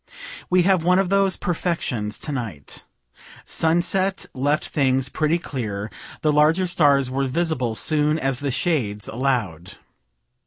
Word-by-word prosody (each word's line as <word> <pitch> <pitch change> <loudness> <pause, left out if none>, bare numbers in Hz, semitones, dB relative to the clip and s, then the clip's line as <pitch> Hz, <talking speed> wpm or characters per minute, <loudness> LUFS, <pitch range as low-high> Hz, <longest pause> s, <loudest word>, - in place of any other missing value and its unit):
We 180 0 +4
have 185 -2 +2
one 180 +2 +4
of 190 -2 +1
those 195 -1 +2
perfections 160 - -2
to 150 - -5
night. 115 - -6 0.6
Sunset 185 +4 +1
left 145 +4 -1
things 135 -2 +1
pretty 155 +4 +1
clear; 110 - -5 0.3
the 155 - +2
larger 155 +5 +3
stars 140 -7 +3
were 135 +1 -1
visible 130 -6 -1
soon 150 +4 +2
as 135 -4 -1
the 140 - -2
shades 125 - -1
allow'd. 110 -9 -2
145 Hz, 130 wpm, -22 LUFS, 125-170 Hz, 0.6 s, We